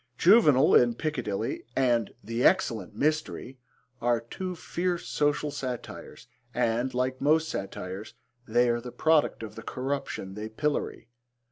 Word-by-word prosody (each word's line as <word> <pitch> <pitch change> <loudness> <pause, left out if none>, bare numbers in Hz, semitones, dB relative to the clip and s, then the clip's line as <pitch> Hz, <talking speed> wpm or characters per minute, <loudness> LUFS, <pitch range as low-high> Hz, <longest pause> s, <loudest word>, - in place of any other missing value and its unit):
Juvenal 155 - +6
in 120 -1 +5
Piccadilly 120 -8 -3
and 120 -5 +2
The 115 +4 -2
Excellent 115 - +2
Mystery 150 -3 -1 0.4
are 120 0 +2
two 180 +11 -6
fierce 175 +1 -2
social 145 0 0
satires 130 -4 -6 0.3
and, 120 +3 +1
like 130 +1 -1
most 155 +2 +3
satires, 95 0 -6 0.3
they 120 +2 +3
are 120 0 0
the 125 0 -8
product 155 -6 +2
of 105 -1 -7
the 115 - -9
corruption 130 -6 -4
they 105 +2 -6
pillory. 145 0 -2
125 Hz, 130 wpm, -28 LUFS, 115-150 Hz, 0.4 s, Juvenal